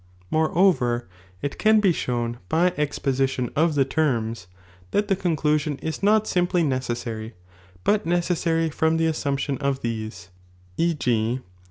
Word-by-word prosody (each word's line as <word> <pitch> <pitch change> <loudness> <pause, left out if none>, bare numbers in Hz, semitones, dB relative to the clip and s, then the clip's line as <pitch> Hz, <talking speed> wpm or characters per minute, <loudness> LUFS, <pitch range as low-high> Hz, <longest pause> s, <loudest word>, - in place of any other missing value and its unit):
More 155 0 +2
oTCT, 125 -10 +3 0.4
it 140 - -3
can 220 0 +5
be 200 -3 +4
shown 120 -4 -2
by 175 +2 +3
exposition 135 -4 -1
ol' 160 +3 +4
the 145 -4 +2
terms, 115 -8 -1 0.4
that 205 - 0
the 195 - +3
cmdosion 155 -5 0
is 160 -1 -4
not 215 +2 +4
simply 180 -3 +1
necessary, 120 -5 -3 0.5
but 210 0 +2
necessary 170 -2 +1
from 160 +2 +1
the 165 - +2
momption 140 -3 -1
of 140 -1 -1
these, 110 -6 -5 0.5
e. 170 - +1
g. 120 -2 0
150 Hz, 140 wpm, -24 LUFS, 120-170 Hz, 0.5 s, can